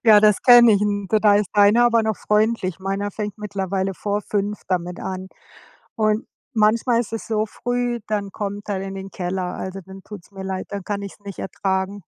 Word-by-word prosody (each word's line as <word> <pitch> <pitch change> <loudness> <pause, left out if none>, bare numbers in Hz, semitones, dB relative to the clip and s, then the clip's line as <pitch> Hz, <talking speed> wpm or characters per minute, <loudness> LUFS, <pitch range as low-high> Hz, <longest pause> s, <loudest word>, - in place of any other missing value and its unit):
Ja, 215 -2 +8
das 210 -1 +4
kenne 240 -2 +8
ich 200 - +3
n 205 -1 -1 0.2
da 210 -2 +6
ist 205 -1 0
deiner 210 +4 +6
aber 230 -1 +4
noch 220 -2 -1
freundlich. 210 -4 0
Meiner 195 +2 -2
fängt 210 0 -5
mittlerweile 195 -2 -2
vor 205 +2 -2
5:00 205 0 -2
damit 180 -1 -2
an 190 0 -5 0.7
und 215 +1 +1 0.3
manchmal 230 +2 +3
ist 225 -2 -6
es 225 - -4
so 215 -1 0
früh, 245 +1 -2
dann 205 -2 -2
kommt 205 0 -5
er 195 -2 -1
in 195 0 -6
den 195 0 -7
Keller. 180 -1 -3
Also, 190 +1 -6
dann 190 0 -11
tut's 205 -3 -11
mir 195 -1 -8
leid, 190 -1 -4
dann 200 -2 -5
kann 200 -1 -3
ich's 200 +1 -9
nicht 200 -2 -9
ertragen. 190 +1 -2
205 Hz, 200 wpm, -22 LUFS, 190-215 Hz, 0.7 s, Ja